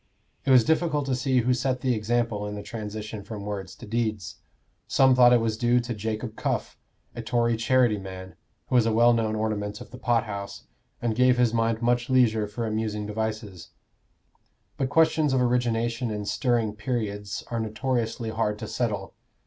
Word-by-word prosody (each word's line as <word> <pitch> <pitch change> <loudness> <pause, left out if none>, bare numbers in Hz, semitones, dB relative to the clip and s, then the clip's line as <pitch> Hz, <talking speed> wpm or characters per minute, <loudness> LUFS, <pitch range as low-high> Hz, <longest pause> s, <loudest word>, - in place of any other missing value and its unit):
It - - -1
was 130 -3 +7
difficult 160 0 +1
to 135 -2 0
see 130 0 +1
who 125 +2 +2
set 130 +1 -1
the 130 -2 +1
example 110 -1 -1
in 105 - -5
the 105 - -6
transition 110 -1 -6
from 100 -1 -7
words 100 -3 -5
to - - -11
deeds. 110 -6 -2 0.5
Some 130 -1 +5
thought 125 -1 +6
it 120 - +6
was 110 -1 -1
due 120 0 +3
to 120 0 -3
Jacob 110 +1 -4
Cuff, - - -2 0.4
a 120 - -6
Tory 115 0 +1
charity 115 -1 +2
man, 95 -1 -8 0.3
who - - -7
was 120 -3 +4
a - - +2
well 120 +2 +5
known 110 -2 0
ornament 105 -1 -2
of - - -11
the 125 - -10
pothouse, 105 -4 -2 0.4
and 115 -2 0
gave 125 +1 +4
his 120 -2 +3
mind 115 0 0
much 120 +1 +1
leisure 115 -5 +3
for 115 +3 -4
amusing 110 -1 -2
devices; 105 -4 -4 1.1
but 135 - -1
questions 155 -2 +3
of 130 - +3
origination 120 -1 0
in 105 -1 -4
stirring 115 -2 0
periods 105 -2 -3
are 115 - -1
notoriously 115 0 -2
hard 110 -2 -1
to - - -6
settle. - - -2
115 Hz, 180 wpm, -26 LUFS, 105-125 Hz, 1.1 s, was